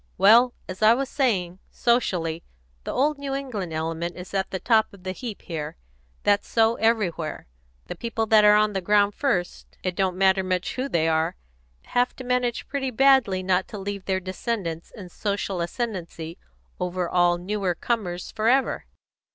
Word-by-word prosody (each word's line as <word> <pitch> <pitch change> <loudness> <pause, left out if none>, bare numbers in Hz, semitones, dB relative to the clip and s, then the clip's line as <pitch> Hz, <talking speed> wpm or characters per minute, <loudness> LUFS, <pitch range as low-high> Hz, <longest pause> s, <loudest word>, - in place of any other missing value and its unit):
"Well, 230 +6 +6
as 185 +2 -7
I 220 +2 +7
was 270 +1 -2
saying, 190 -10 0
socially, 180 -9 0 0.4
the - - -3
old 295 +2 +1
New 275 -1 -3
England 230 -11 -4
element 165 +2 -3
is 180 +2 -9
at 190 -1 0
the 190 - -3
top 220 0 +3
of 195 -2 -16
the 185 - -3
heap 215 +2 -7
here. 160 -2 -5 0.5
That's 205 0 +2
so 225 0 +3
everywhere. 205 -8 0 0.4
The - - -5
people 225 +3 -2
that 215 -1 +5
are 210 0 +7
on 210 0 +3
the 190 - -1
ground 205 +2 +3
first, 195 -11 -2
it 185 -1 -2
don't 190 -2 0
matter 190 0 +4
much 185 -1 -1
who 260 +2 -3
they 165 -6 +1
are, 160 0 +1 0.5
have 245 +1 0
to 260 - -8
manage 250 -1 -1
pretty 270 -2 -2
badly 255 -7 +4
not 185 0 +1
to 210 - -8
leave 200 -1 -5
their 190 -1 0
descendants 185 -3 -4
in 185 -5 -11
social 200 -1 -2
ascendency 170 -4 -4 0.4
over 180 0 -2
all 175 0 +3
newer 190 0 -2
comers 180 -5 -3
for 220 0 -1
ever. 265 +2 +1
195 Hz, 175 wpm, -25 LUFS, 180-230 Hz, 0.5 s, I